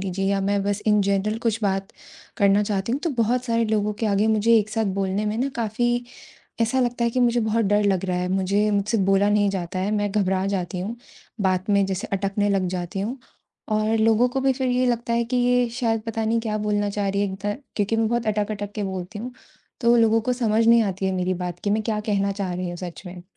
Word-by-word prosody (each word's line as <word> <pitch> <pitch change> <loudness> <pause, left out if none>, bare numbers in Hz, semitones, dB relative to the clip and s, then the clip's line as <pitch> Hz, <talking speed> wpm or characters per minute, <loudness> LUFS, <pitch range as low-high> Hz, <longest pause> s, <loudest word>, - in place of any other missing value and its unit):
लीजिए 195 0 -3
या 195 0 +1
मैं 200 +1 0
बस 205 +1 -2
इन 210 -1 +4
जनरल 200 +3 0
कुछ 225 -1 -1
बात 195 -1 0 0.5
करना 200 +1 +4
चाहती 200 +1 -2
हूँ 270 - -1
तो 335 - +1
बहुत 250 +3 0
सारे 230 -1 +1
लोगों 210 -1 0
के - - +2
आगे 205 +1 +2
मुझे 220 +1 +4
एक 210 -1 -1
साथ 220 +1 0 0.2
बोलने 195 +2 -1
में 210 - -1
ना 260 +3 0
काफ़ी 240 +2 0 0.6
ऐसा 235 +3 +2
लगता 240 -1 0
है 235 - +2
कि 255 - -1
मुझे 240 -1 +3
बहुत 220 0 +1
डर 205 +1 +2
लग 195 -2 +1
रहा 180 -1 -1
है, 180 0 -2
मुझे 195 +3 +1
मुझसे 210 +2 0
बोला 195 +1 +3
नहीं 205 -1 +3
जाता 185 -1 -4
है 190 +2 -1
मैं 205 -1 0
घबरा 190 -2 +1
जाती 185 -2 -2
हूँ, 210 +6 -4 0.4
बात 185 0 0
में 200 -1 +4
जैसे 190 -1 -3
अटकने 200 +1 0
लग 195 -2 +1
जाती 180 +2 -4
हूँ। 235 +7 -3 0.5
और 215 +1 +1
लोगों 225 +2 +4
को 265 +2 -2
भी 265 0 +3
फिर 260 0 -2
ये 250 +1 +2
लगता 235 -1 -1
है 235 0 +1
कि 245 +2 -2
ये 245 0 +3
शायद 230 -2 -1
पता 225 0 -2
नहीं 225 +1 +1
क्या 220 -2 -2
बोलना 205 -1 0
चाह 200 0 -1
रही 200 +1 0
है 205 - +2
एक - - -4
ध 205 0 -1 0.2
क्योंकि 210 +2 0
मैं 225 0 +2
बहुत 235 0 -1
अटक-अटक 205 -1 -2
के 210 - -3
बोलती 190 +2 -5
हूँ 245 +4 -6 0.5
तो 235 -1 +4
लोगों 225 -1 +4
को 250 +3 -1
समझ 225 -2 +1
नहीं 230 0 +6
आती 190 -2 -2
है 190 - 0
मेरी 185 0 0
बात, 180 -1 -5
कि 205 - -1
मैं 215 +1 +1
क्या 215 -1 -1
कहना 200 -1 +1
चाह 195 -2 -3
रही 180 0 -3
हूँ 175 - -5
सच 175 0 -7
में? 180 0 -9
210 Hz, 245 wpm, -23 LUFS, 195-230 Hz, 0.6 s, नहीं